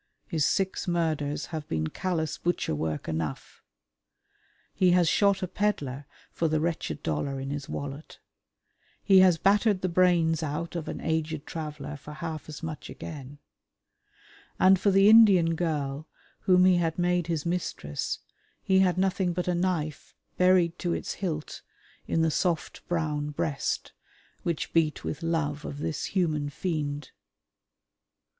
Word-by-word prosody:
His 160 -6 -1
six 190 -1 0
murders 155 -4 -1
have 155 -2 -4
been 80 -1 -1
callous 160 - -2
butcher 175 - -1
work 75 0 -3
enough. 80 -3 -4 1.1
He 180 -2 +3
has 175 -2 +4
shot 200 +2 +3
a - - 0
pedlar 145 -10 -2 0.2
for 165 - 0
the 155 0 +1
wretched 160 - -2
dollar 80 - -2
in 135 +1 -4
his 145 -1 -5
wallet; 140 +2 -6 0.9
he 195 -2 +6
has 185 -3 +6
battered 200 +1 +3
the 185 - 0
brains 170 -2 +3
out 160 +3 -3
of 165 -3 -4
an - - -5
aged 160 -1 -2
traveller 150 -2 -6
for 150 +2 -10
half 155 0 -6
as 150 +1 -8
much 160 -2 -6
again, 145 -2 -8 1.2
and 190 0 +6
for 200 - +3
the 195 +1 +5
Indian 200 -7 +7
girl 155 -3 -2 0.3
whom 180 -1 +4
he 185 -1 +5
had 165 -2 0
made 175 -1 +1
his 165 -3 -2
mistress 170 - -2 0.5
he 190 0 +3
had 185 -2 +3
nothing 185 -1 +1
but 180 +1 -3
a 180 - +2
knife 170 -4 -2 0.2
buried 180 -2 +3
to 175 -2 -1
its - - -3
hilt 160 -6 -4 0.5
in 165 - +1
the 160 - +2
soft 170 +1 -1
brown 150 -4 -1
breast 145 -1 -2 0.5
which 170 -3 -3
beat 160 -2 +1
with 155 - -4
love 160 -3 -1
of 140 - -6
this 150 +1 -3
human 155 -6 0
fiend. 145 -2 -3
165 Hz, 150 wpm, -27 LUFS, 150-180 Hz, 1.2 s, Indian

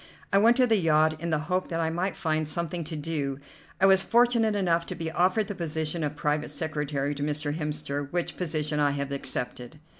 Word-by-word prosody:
I 195 - +6
went 230 +3 +5
to 255 - +5
the 225 -3 +3
yacht 155 -2 +3
in 170 - -2
the 160 - +2
hope 185 +2 0
that 165 -2 -3
I 160 -1 0
might 180 +3 -1
find 155 -2 0
something 170 +2 -2
to 160 +1 -5
do. 145 -3 -2 0.4
I 190 - +5
was 190 0 +6
fortunate 235 -1 +3
enough 170 -4 +1
to - - -5
be 160 -1 -4
offered 185 +6 +2
the 205 - -3
position 160 -2 -3
of 150 0 -2
private 150 0 -1
secretary 150 -3 -2
to 145 - -7
Mr. 150 0 -1
Hemster, 150 -2 -3
which 175 -1 -2
position 155 -3 -1
I 145 -1 +3
have 140 0 -3
accepted." 125 -1 -5
160 Hz, 210 wpm, -27 LUFS, 150-180 Hz, 0.4 s, I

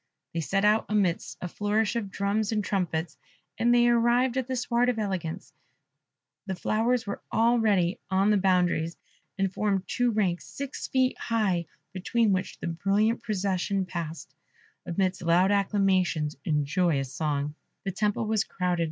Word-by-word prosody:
They 165 - -1
set 195 +5 0
out 215 +1 +3
amidst 200 -5 0
a 180 - -3
flourish 205 +4 0
of 220 -4 -2
drums 200 +2 -1
and 210 -2 0
trumpets, 175 -5 -2 0.4
and 235 +1 +3
they 240 0 +5
arrived 240 +1 +3
at 260 -2 -1
the 260 - -2
Sward 245 0 +1
of 245 - -1
Eloquence: 190 -6 -3 0.9
the 190 - -2
flowers 225 +6 0
were 200 - -5
already 220 -6 +2
on 195 +2 +3
the 210 - +4
boundaries, 180 -3 +1 0.4
and 195 -1 0
formed 200 -2 0
two 245 +6 +1
ranks 195 -6 0
six 280 -1 -6
feet 260 -1 +1
high, 195 -8 0 0.3
between 210 +4 +1
which 185 0 -2
the - - -7
brilliant 200 +7 +1
procession 195 -3 -1
passed, 170 -3 -6 0.5
amidst 185 +1 0
loud 175 +3 +3
acclamations 190 -6 +1
and 150 -3 +1
joyous 145 -5 0
songs. 145 -1 -1 0.3
The 195 - -2
temple 210 +3 0
was 215 -1 +1
crowded. 180 -1 -2
195 Hz, 150 wpm, -27 LUFS, 175-220 Hz, 0.9 s, they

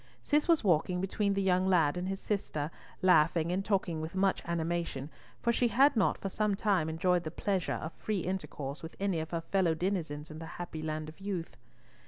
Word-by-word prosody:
Cis 295 +1 +2
was 330 -6 +4
walking 180 -1 +2
between 200 +2 0
the 195 - +1
young 185 0 +3
lad 165 -6 +4
and 180 +1 -3
his 195 0 -3
sister, 155 -7 -2 0.3
laughing 165 -1 +4
and 190 +2 0
talking 190 -6 0
with 160 +3 -5
much 190 0 +2
animation, 165 -4 -2 0.3
for 235 - +3
she 245 - +3
had 265 +6 +5
not 215 -4 +2
for - - -4
some 210 +1 0
time 195 -6 +1
enjoyed 175 +2 +1
the 155 - -3
pleasure 190 +2 -1
of 160 - -5
free 210 -4 -2
intercourse 155 -6 -4
with 165 0 -8
any 195 -4 0
of 160 0 -4
her 170 -1 -2
fellow 175 -1 +1
denizens 160 -4 -2
in 155 - -8
the 165 - -7
happy 175 -3 -5
land 155 0 -3
of 155 - -11
youth. 185 -8 -4
180 Hz, 205 wpm, -31 LUFS, 160-195 Hz, 0.3 s, had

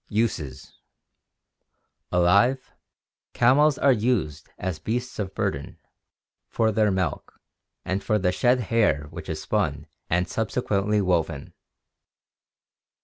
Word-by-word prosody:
Uses. 90 - -2 0.7
— - - -53
Alive, 100 +9 +3 0.6
camels 140 +4 +4
are 140 - +4
used 105 - -1
as 90 -4 -4
beasts 120 +8 -3
of 95 -2 -4
burden, 95 -10 -3 0.7
for 110 -1 +1
their 105 0 +2
milk, 95 -2 -3 0.5
and 95 +2 -2
for 110 - +1
the 90 -3 +1
shed 125 +6 +2
hair 105 - +1
which - - -8
is - - -3
spun - - -1 0.2
and 85 +1 +1
subsequently 105 -1 0
woven. 85 -5 -1
100 Hz, 110 wpm, -25 LUFS, 90-115 Hz, 0.7 s, camels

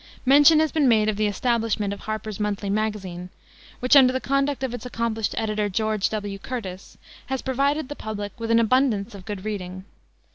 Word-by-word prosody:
Mention 290 +4 +7
has 315 - +1
been 300 -4 +2
made 215 -3 +4
of 215 - -1
the 210 +1 +1
establishment 220 -2 0
of 200 - -8
Harper's 215 -1 -5
Monthly 205 -1 -2
Magazine, 195 -4 -3 0.5
which, 250 +3 +4
under 260 -2 +8
the 260 - -1
conduct 275 0 0
of 255 -2 -2
its 245 - -6
accomplished 230 -3 -2
editor, 215 -2 -1
George 215 0 0
W. 205 -2 -4
Curtis, 195 -5 -7 0.3
has 265 -1 -3
provided 275 +3 0
the 290 - -6
public 205 -4 -6
with 230 0 -4
an 230 - +4
abundance 230 -2 +2
of 195 -2 -11
good 205 -2 -6
reading. 185 -3 -5
220 Hz, 185 wpm, -24 LUFS, 205-255 Hz, 0.5 s, under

